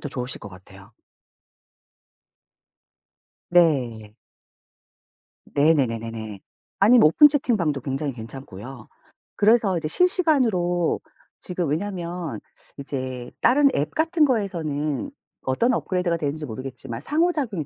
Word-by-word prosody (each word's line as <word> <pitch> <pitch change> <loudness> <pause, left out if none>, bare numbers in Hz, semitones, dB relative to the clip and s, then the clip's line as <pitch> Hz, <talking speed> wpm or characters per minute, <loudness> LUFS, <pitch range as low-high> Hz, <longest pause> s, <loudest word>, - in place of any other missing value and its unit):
더 145 - -5
좋으실 125 -2 -5
것 - - -8
같아요. 95 +3 -15 2.6
네. 125 -11 +2 1.4
네네 145 -1 +4
네네네. 115 -3 -6 0.4
아니면 220 -2 +6
오픈 295 - +7
채팅방도 210 - 0
굉장히 135 +2 -3
괜찮고요. 120 0 -10 0.5
그래서 210 -3 +3
이제 155 -2 -3
실시간으로 235 - +2 0.4
지금 175 -4 -1
왜냐면 175 -1 -4 0.4
이제 130 -3 -5
다른 280 +3 +5
앱 145 - -1
같은 320 0 +2
거에서는 170 - -2 0.3
어떤 230 - +1
업그레이드가 180 -6 -1
되는지 150 0 -3
모르겠지만 125 -1 -6
상호작용이 295 - 0
155 Hz, 260 characters per minute, -23 LUFS, 130-205 Hz, 2.6 s, 오픈